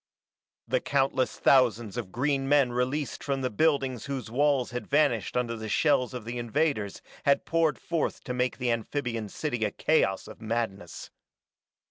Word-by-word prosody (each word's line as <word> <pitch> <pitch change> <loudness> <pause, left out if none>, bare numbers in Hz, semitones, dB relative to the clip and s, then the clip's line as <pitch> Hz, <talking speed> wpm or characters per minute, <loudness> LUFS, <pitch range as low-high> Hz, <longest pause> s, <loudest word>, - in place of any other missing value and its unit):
The - - +1
countless 135 -2 0
thousands 120 -5 +3
of 115 -6 -5
green 135 +3 0
men 140 -4 +4
released 125 +2 -2
from 140 -2 -1
the 130 - -1
buildings 135 -1 +1
whose 135 -5 -4
walls 140 -1 +2
had 125 0 -5
vanished 140 -7 +2
under 120 -1 -1
the 110 -1 -6
shells 130 0 +2
of 120 -4 -6
the 120 +1 -4
invaders 120 -4 -1 0.2
had 140 - +3
poured 165 -2 +2
forth 165 -3 -2
to 125 - -4
make 125 0 0
the 125 -2 0
amphibian 115 -2 -2
city 120 -1 -3
a 105 - +2
chaos 100 -5 +1
of - - -12
madness. 110 -5 -4
125 Hz, 160 wpm, -28 LUFS, 115-140 Hz, 0.2 s, men